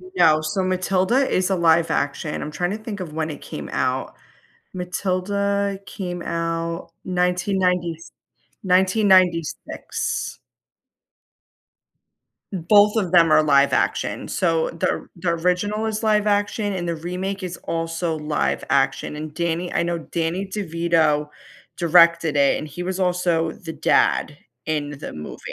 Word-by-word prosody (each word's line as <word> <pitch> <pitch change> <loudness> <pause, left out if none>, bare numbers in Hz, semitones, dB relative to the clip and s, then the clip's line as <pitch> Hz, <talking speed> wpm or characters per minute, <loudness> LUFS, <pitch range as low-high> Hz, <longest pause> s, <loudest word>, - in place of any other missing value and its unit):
No, 155 - +5
so 155 +5 -1
Matilda 185 +7 +1
is 185 +1 +1
a 190 - +2
live 165 -1 +3
action, 145 +2 -2
I'm 150 - -5
trying 175 +5 -2
to 210 - -3
think 215 -2 -7
of 165 -5 -6
when 160 0 -2
it 150 - -7
came - - -7
out - - -1 0.6
Matilda 195 +2 -1
came 175 -2 -5
out 165 0 -3
nineteen 180 +2 0
ninety 180 -2 +1
s 165 - -14 0.5
1996. 185 -3 +1 2.1
Both 205 +4 +4
of 190 -6 0
them 170 -3 +5
are 155 - +6
live 140 -2 +4
action. - - 0
So, 165 -3 +1
the 165 - -1
or - - -4
the 170 0 -2
original 180 +6 0
is 215 +1 -3
live 210 -1 +2
action, 205 0 0
and 175 -2 -3
the 170 - -1
remake 185 +4 -4
is 180 -1 -5
also 165 0 -2
live 150 0 -1
action, 135 +1 +1
and 150 0 -6
Danny 170 +1 -2
I - - +1
know 170 0 -1
Danny 165 +3 -3
DeVito 165 -6 0 0.5
directed 170 -2 +4
it, 140 -1 +4
and 155 - -6
he 155 +5 -6
was 185 +1 -3
also 175 -3 +1
the 165 -3 -8
dad 145 - +2 0.3
in 150 -2 -2
the - - -6
movie, 75 0 -8
175 Hz, 145 wpm, -22 LUFS, 160-190 Hz, 2.1 s, are